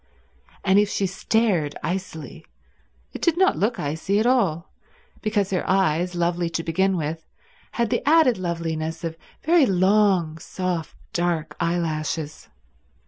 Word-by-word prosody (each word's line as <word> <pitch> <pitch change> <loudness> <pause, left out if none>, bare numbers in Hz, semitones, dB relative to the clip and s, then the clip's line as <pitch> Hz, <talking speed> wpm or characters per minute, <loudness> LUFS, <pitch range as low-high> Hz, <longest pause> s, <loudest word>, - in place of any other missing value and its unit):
And 195 0 +4
if 205 0 +2
she 200 - 0
stared 195 -5 0
icily 170 -3 -5 0.7
it - - -7
did 335 -1 +2
not 380 +1 +3
look 220 +4 +1
icy 160 +7 -1
at 220 - +1
all, 195 -10 +1 0.5
because 210 -3 0
her 185 - 0
eyes, 180 -2 +1
lovely 175 0 0
to 165 0 -3
begin 190 +3 +1
with, 160 +1 -4 0.5
had 235 -3 0
the - - +1
added 310 -9 +5
loveliness 165 -2 -3
of 165 -1 -3 0.3
very 320 -3 +4
long, 185 -4 +2
soft, 180 -3 -4 0.2
dark 165 -3 -1
eyelashes. 160 -3 -2
180 Hz, 135 wpm, -23 LUFS, 165-205 Hz, 0.7 s, added